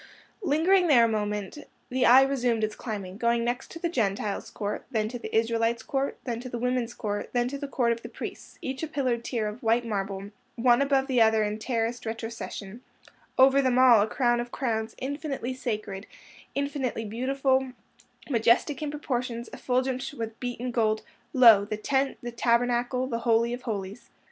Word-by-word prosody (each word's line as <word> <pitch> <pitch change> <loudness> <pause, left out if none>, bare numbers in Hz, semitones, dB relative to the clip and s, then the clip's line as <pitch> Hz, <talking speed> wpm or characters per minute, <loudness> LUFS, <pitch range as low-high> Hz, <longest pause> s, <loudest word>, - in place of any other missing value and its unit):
Lingering 355 +2 +3
there 255 -7 +6
a - - +2
moment, 210 +2 -2 0.3
the 255 0 +3
eye 260 +3 +8
resumed 245 -5 0
its 215 0 -1
climbing, 200 -4 -6
going 235 +1 +1
next 245 +2 -2
to - - -8
the 340 +1 -1
Gentiles' 210 - -1
Court, 205 -1 -4
then 220 -4 0
to 245 +1 -6
the - - -6
Israelites' 230 0 +1
Court, 275 0 -2
then 235 -3 -3
to 255 +1 -7
the 240 - -4
Women's 250 -1 -1
Court, 205 -2 -3
then 245 0 +2
to 280 +1 -5
the 285 - -4
Court 245 -4 +1
of 230 0 -2
the - - -8
Priests, - - -8
each 265 0 -4
a 320 - -2
pillared 255 -6 -1
tier 230 -3 -2
of 210 +3 -7
white 230 +1 +2
marble, 195 -2 -3 0.2
one 240 +1 +4
above 275 -1 +2
the 255 -3 +2
other 220 -1 +4
in 210 +1 -2
terraced 230 0 -2
retrocession; 225 -2 -6 0.6
over 270 +1 +6
them 255 -2 +2
all 250 -4 +7
a 210 - +2
crown 240 +1 +1
of 240 0 -4
crowns 220 -4 -2
infinitely 275 -2 -4
sacred, 215 -5 -4 0.5
infinitely 280 -5 -2
beautiful, 260 +3 0 0.5
majestic 245 +3 +2
in 300 - -2
proportions, 245 -5 -3
effulgent 260 +2 -1
with 225 -1 -5
beaten 245 0 -4
gold—lo! 220 -1 +4
the 215 0 -4
Tent, 270 +5 0
the 240 - -4
Tabernacle, 245 +2 +1
the 235 -3 -3
Holy 235 0 +2
of 245 - -5
Holies. 205 -2 -5
240 Hz, 180 wpm, -27 LUFS, 225-260 Hz, 0.6 s, eye